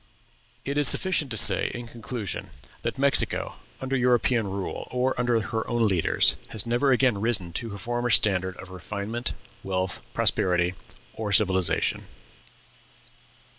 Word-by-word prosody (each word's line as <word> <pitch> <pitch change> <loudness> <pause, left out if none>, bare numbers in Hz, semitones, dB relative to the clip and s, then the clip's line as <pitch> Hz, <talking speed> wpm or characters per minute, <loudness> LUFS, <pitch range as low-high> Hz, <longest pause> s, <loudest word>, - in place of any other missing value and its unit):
It 140 +1 -1
is 145 - +2
sufficient 185 -5 +2
to 115 - -3
say, 115 +1 +4
in 120 0 -6
conclusion, 115 -3 -6 0.3
that - - -3
Mexico, 140 +1 +1 0.2
under 130 +1 -2
European 120 -3 +2
rule, 95 0 -5
or 125 +1 0
under 120 -2 +2
her 110 +1 -3
own 120 -2 +2
leaders, 90 -5 +3
has 110 -1 -2
never 120 +4 +1
again 125 -5 +2
risen 100 -7 +1
to 115 - -6
her 100 - -7
former 120 +4 -2
standard 95 -4 +3
of 95 - -11
refinement, 105 +6 -4 0.3
wealth, 95 -1 -2
prosperity, 90 -1 +1 0.4
or 110 -2 -4
civilization. 95 -3 +2
115 Hz, 135 wpm, -25 LUFS, 95-125 Hz, 0.4 s, say